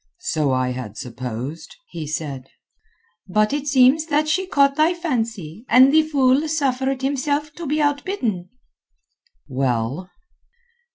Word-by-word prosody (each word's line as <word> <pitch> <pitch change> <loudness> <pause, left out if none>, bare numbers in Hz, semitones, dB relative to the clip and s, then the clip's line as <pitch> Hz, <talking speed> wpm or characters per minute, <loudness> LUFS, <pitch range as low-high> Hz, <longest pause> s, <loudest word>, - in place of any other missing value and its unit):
"So 155 - -1
I 130 -1 0
had 125 -4 -7
supposed," 125 - -6 0.2
he 155 -2 -6
said. 140 -4 -5 0.8
"But 215 +5 +1
it 290 0 -2
seems 275 +3 +4
that 305 0 +1
she 370 +5 0
caught 280 -5 +3
thy 315 +4 +3
fancy, 225 - -3
and 260 +4 +6
the 315 - +6
fool 285 -1 +2
suffered 270 -3 -1
himself 285 +2 -1
to 335 -1 -7
be 300 +2 0
outbidden." 285 - -2 1.0
"Well?" 130 +5 -2
255 Hz, 125 wpm, -21 LUFS, -, 1.0 s, and